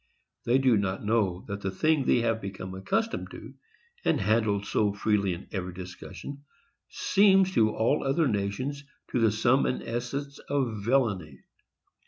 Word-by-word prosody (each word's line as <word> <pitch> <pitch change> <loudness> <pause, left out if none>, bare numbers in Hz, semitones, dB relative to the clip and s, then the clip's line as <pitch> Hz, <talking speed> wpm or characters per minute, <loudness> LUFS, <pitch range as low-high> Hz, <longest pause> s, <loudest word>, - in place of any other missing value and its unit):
They 120 +2 +4
do 130 -4 +4
not 100 0 -2
know 105 -5 0
that 100 -1 -5
the 95 - -1
thing 145 +8 +1
they 120 - +4
have 115 -1 0
become 95 -1 -6
accustomed 220 - -2
to, - - -10 0.5
and - - +2
handled 105 -1 +1
so 105 -2 +1
freely 105 -3 +1
in 85 - -12
every 90 -3 -4
discussion, 95 +9 -9 0.5
seems 195 -2 +4
to 110 -7 +4
all 115 +6 +1
other 145 +3 +2
nations 125 +7 -2 0.3
the 115 -3 +3
sum 120 +5 +3
and - - -2
essence 135 +4 -4
of 125 -7 -1
villany. 100 - 0
110 Hz, 150 wpm, -28 LUFS, 100-135 Hz, 0.5 s, They